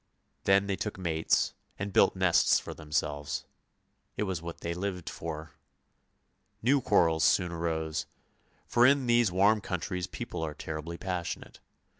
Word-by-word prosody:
Then 100 +1 +5
they 100 -1 -1
took 105 +1 -4
mates 80 -4 +1 0.2
and 100 0 -4
built - - +5
nests - - +4
for - - -7
them 75 -2 -13
selves; 75 -2 -1 0.7
it - - +1
was 95 -5 -2
what 85 0 -7
they 85 - -2
lived 90 -1 -4
for. 80 -1 -6 1.1
New 135 +3 +4
quarrels 80 -7 +3
soon 90 -3 +3
arose, 80 -2 -2 0.6
for 120 - +3
in 140 -1 +3
these 120 -4 +4
warm 100 +4 +4
countries 90 0 -3
people - - -6
are 75 -2 -3
terribly 80 +2 -5
passionate. 90 -2 -4
85 Hz, 145 wpm, -30 LUFS, 80-100 Hz, 1.1 s, Then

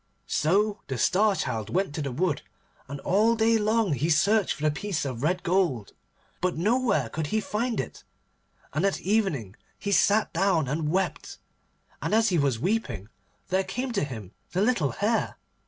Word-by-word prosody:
So 205 +6 +1
the 135 - -3
Star 200 - +3
Child 110 - -3
went 190 -4 0
to 155 - -3
the 140 -2 -3
wood, 160 +3 0 0.5
and 140 +1 -6
all 215 +5 +3
day 225 0 +3
long 215 -4 +2
he 145 +5 0
searched 200 +6 +3
for 150 - -9
the 155 - +3
piece 195 -1 -3
of 125 -4 -4
red 175 +5 0
gold, 170 - 0 0.5
but 180 -2 0
nowhere 210 - +2
could 155 +6 -3
he 220 - 0
find 225 +3 -2
it. - - -5 0.7
And 155 - 0
at 195 -1 +1
evening 175 - 0 0.2
he 200 - -3
sat 205 +2 +4
him 170 - 0
down 175 -7 +2
and 150 +3 -1
wept, 190 +3 -2 0.6
and - - 0
as 225 0 +4
he 175 -3 +2
was 140 -5 +1
weeping 180 - -2 0.4
there 190 +1 +2
came 245 +7 -3
to 205 -7 0
him 110 -9 -6 0.2
the 185 - +1
little 210 - +2
Hare. 220 - -1
185 Hz, 180 wpm, -27 LUFS, 145-210 Hz, 0.7 s, sat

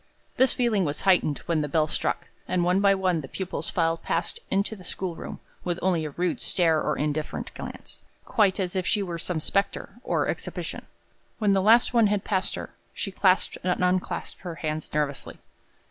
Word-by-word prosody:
This 260 0 +5
feeling 230 -6 +2
was 145 -3 -2
heightened 180 -6 +3
when 165 -2 +1
the 150 - -1
bell 155 +2 +3
struck, 155 - -1 0.2
and 180 -1 +1
one 180 +2 +3
by 200 0 +5
one 185 -4 +1
the 135 - -8
pupils 190 +6 -3
filed 165 -1 +1
past - - -1
into 200 +3 +1
the 190 - -13
schoolroom, 180 -2 -5 0.2
with 175 -1 -1
only 175 -4 +2
a - - -3
rude 175 +4 -1
stare 165 -4 +3
or - - 0
indifferent 150 +1 -2
glance, - - -8 0.2
quite 205 -3 +3
as 185 -1 -2
if 185 -1 0
she 210 -2 +2
were 170 -3 -4
some 170 0 -1
specter 200 +5 0
on - - +1
exhibition. - - -4 0.5
When 210 -4 +3
the 195 - +3
last 225 +5 +5
one 230 -3 +5
had 205 -1 0
passed 190 -3 0
her, - - -6 0.2
she 195 - -3
clasped 190 -1 +2
and 180 0 +1
unclasped 180 0 -1
her 175 -3 -5
hands 155 -1 -3
nervously. 145 -2 -2
180 Hz, 190 wpm, -26 LUFS, 165-195 Hz, 0.5 s, This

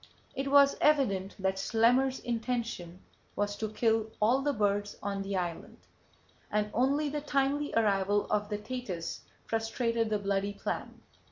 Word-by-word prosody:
It 270 +1 -2
was 280 0 +6
evident 205 -11 +2
that 190 -1 -1
Schlemmer's 250 +5 +3
intention 230 -7 -3 0.3
was 205 0 -1
to 220 - -2
kill 220 0 +1
all 240 +6 +3
the 290 +1 +1
birds 205 -3 0
on 200 0 -2
the 195 0 -3
island, 175 -2 -4 0.7
and 210 0 0
only 275 +5 +2
the 295 +1 -3
timely 285 0 0
arrival 205 -2 +2
of 210 0 0
the 210 - -1
Thetis 210 -6 -5 0.2
frustrated 225 0 0
that 210 -1 -1
bloody 200 0 0
plan. - - -5
220 Hz, 145 wpm, -30 LUFS, 200-255 Hz, 0.7 s, was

